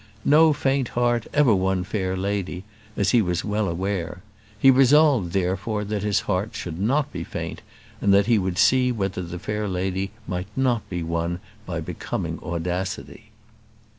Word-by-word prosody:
No 155 Hz, +2 st, +6 dB
faint 135 Hz, -3 st, 0 dB
heart 120 Hz, -2 st, +1 dB
ever 145 Hz, -6 st, +4 dB
won 95 Hz, -1 st, +1 dB
a -, -, -3 dB
fair 95 Hz, -1 st, -2 dB
lady, 95 Hz, -2 st, -2 dB, 0.3 s
as 100 Hz, -, +2 dB
he 120 Hz, -, +5 dB
was 90 Hz, -3 st, -1 dB
well 105 Hz, 0 st, 0 dB
aware; 90 Hz, 0 st, -3 dB, 0.3 s
he 135 Hz, -, +6 dB
resolved, 135 Hz, -, +4 dB
therefore, 95 Hz, +4 st, -1 dB
that 105 Hz, 0 st, -3 dB
his 105 Hz, 0 st, +1 dB
heart 100 Hz, +2 st, -2 dB
should 85 Hz, -1 st, -5 dB
not 135 Hz, +8 st, +1 dB
be 90 Hz, -2 st, -4 dB
faint, -, -, -6 dB, 0.4 s
and 100 Hz, -, +3 dB
that 100 Hz, 0 st, +5 dB
he 115 Hz, -1 st, +3 dB
would 95 Hz, -2 st, -2 dB
see 125 Hz, +5 st, +4 dB
whether 95 Hz, -5 st, -2 dB
the 90 Hz, 0 st, -6 dB
fair 105 Hz, +3 st, -3 dB
lady 95 Hz, +1 st, -2 dB, 0.2 s
might 90 Hz, 0 st, -3 dB
not 125 Hz, -4 st, 0 dB
be 90 Hz, -2 st, -3 dB
won 85 Hz, +1 st, -2 dB, 0.3 s
by 85 Hz, -2 st, -3 dB
becoming 80 Hz, -, -4 dB
audacity. 90 Hz, +2 st, -4 dB
100 Hz, 165 wpm, -24 LUFS, 90-115 Hz, 0.4 s, No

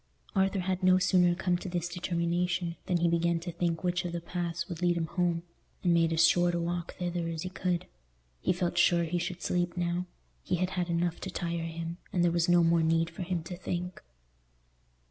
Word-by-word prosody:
Arthur 195 Hz, 0 st, +2 dB
had 185 Hz, +1 st, -1 dB
no 185 Hz, 0 st, +5 dB
sooner 180 Hz, -1 st, +4 dB
come 180 Hz, -1 st, 0 dB
to 185 Hz, -, -6 dB
this 175 Hz, -1 st, -2 dB
determination 175 Hz, 0 st, -1 dB
than 180 Hz, -, +2 dB
he 170 Hz, 0 st, +2 dB
began 170 Hz, 0 st, +2 dB
to 175 Hz, +1 st, -5 dB
think 170 Hz, 0 st, -1 dB
which 180 Hz, 0 st, 0 dB
of 175 Hz, -1 st, -4 dB
the 170 Hz, -, -1 dB
paths 170 Hz, 0 st, -3 dB
would 175 Hz, -3 st, -6 dB
lead 175 Hz, -1 st, +2 dB
him 165 Hz, -, 0 dB
home, 170 Hz, 0 st, 0 dB, 0.4 s
and 175 Hz, -2 st, +4 dB
made 165 Hz, -1 st, +3 dB
as 165 Hz, +1 st, +5 dB
short 175 Hz, 0 st, +3 dB
a -, -, 0 dB
walk 170 Hz, 0 st, -3 dB
thither 175 Hz, -1 st, -2 dB
as 165 Hz, 0 st, -3 dB
he 185 Hz, -, -3 dB
could. 180 Hz, -2 st, -1 dB, 0.5 s
He -, -, +1 dB
felt 175 Hz, -1 st, 0 dB
sure 175 Hz, -1 st, +4 dB
he 170 Hz, +1 st, -1 dB
should 175 Hz, +1 st, -4 dB
sleep 175 Hz, 0 st, 0 dB
now: 175 Hz, +1 st, -1 dB, 0.3 s
he -, -, -1 dB
had 185 Hz, +1 st, -1 dB
had 180 Hz, -2 st, -2 dB
enough 170 Hz, 0 st, 0 dB
to 190 Hz, -, -5 dB
tire 170 Hz, -2 st, -2 dB
him, 165 Hz, +1 st, -5 dB
and 175 Hz, -, +1 dB
there 175 Hz, -, +4 dB
was 170 Hz, +1 st, +1 dB
no 175 Hz, -1 st, +6 dB
more 165 Hz, 0 st, +4 dB
need 165 Hz, +1 st, +2 dB
for 170 Hz, -, -8 dB
him 175 Hz, -2 st, -2 dB
to 175 Hz, +2 st, -6 dB
think. 180 Hz, 0 st, -4 dB
175 Hz, 220 wpm, -30 LUFS, 170-180 Hz, 0.5 s, no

